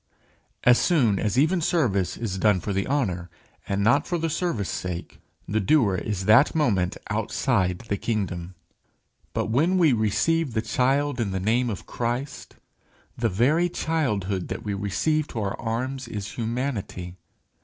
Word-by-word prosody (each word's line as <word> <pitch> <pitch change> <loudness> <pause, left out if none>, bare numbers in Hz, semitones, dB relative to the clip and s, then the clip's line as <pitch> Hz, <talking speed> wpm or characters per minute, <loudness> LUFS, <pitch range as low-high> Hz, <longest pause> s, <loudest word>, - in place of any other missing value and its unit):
As 125 0 +6
soon 125 - +3
as 110 +2 -1
even 165 +6 +3
service 120 - +1
is 100 -5 -3
done 105 -2 +3
for 100 - -3
the 100 +1 -1
honour 95 -11 -1 0.4
and 100 0 0
not 140 +7 +3
for 175 - 0
the 165 -1 -1
service 155 - -1
sake, 90 -2 -5 0.3
the 110 +3 0
doer 110 0 +3
is 95 0 -3
that 110 +10 +5
moment 100 - +1
outside 105 -3 0
the 100 - -1
kingdom. 95 -6 -3 0.8
But - - -1
when 165 +10 +3
we 165 -7 +5
receive 120 +7 +1
the 110 - +2
child 135 +4 +1
in 110 -4 0
the 95 0 -2
name 115 +6 +1
of 100 -6 -5
Christ, 125 +4 -4 0.6
the 115 -1 0
very 145 - +2
childhood 105 - -1
that - - -5
we 105 - -2
receive 105 +11 0
to 115 - -5
our 100 -1 -3
arms 125 +4 -3
is 105 -2 -5
humanity. 115 -7 -4
115 Hz, 155 wpm, -25 LUFS, 100-140 Hz, 0.8 s, As